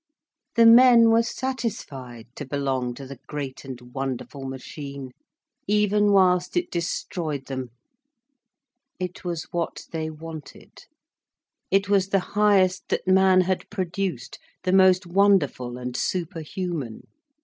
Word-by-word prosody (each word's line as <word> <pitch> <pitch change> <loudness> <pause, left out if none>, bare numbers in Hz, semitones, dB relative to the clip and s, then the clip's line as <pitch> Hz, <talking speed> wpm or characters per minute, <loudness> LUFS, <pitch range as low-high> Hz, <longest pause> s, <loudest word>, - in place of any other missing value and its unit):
The 230 - +6
men 235 0 +8
were 225 +1 +5
satisfied 220 - -5
to - - -6
belong 130 -3 -2
to 135 - -9
the 135 -1 -10
great 140 -3 -6
and 130 -3 -8
wonderful 135 +1 -5
machine, 135 0 -7 0.6
even 210 0 +3
whilst 180 - +3
it 350 0 -1
destroyed 165 -4 -3
them. 130 -2 -5 1.3
It 180 0 -5
was 170 -3 -3
what 170 -1 -3
they 160 -1 -3
wanted. 160 -1 -11 0.8
It 195 +1 +2
was 200 -2 +2
the 195 0 +2
highest 195 -3 +3
that - - -2
man 190 0 +5
had 185 0 -2
produced, 185 - -4 0.2
the 185 - 0
most 190 0 +5
wonderful 170 -10 +2
and 125 0 -6
superhuman. 165 - -3
175 Hz, 120 wpm, -24 LUFS, 140-195 Hz, 1.3 s, men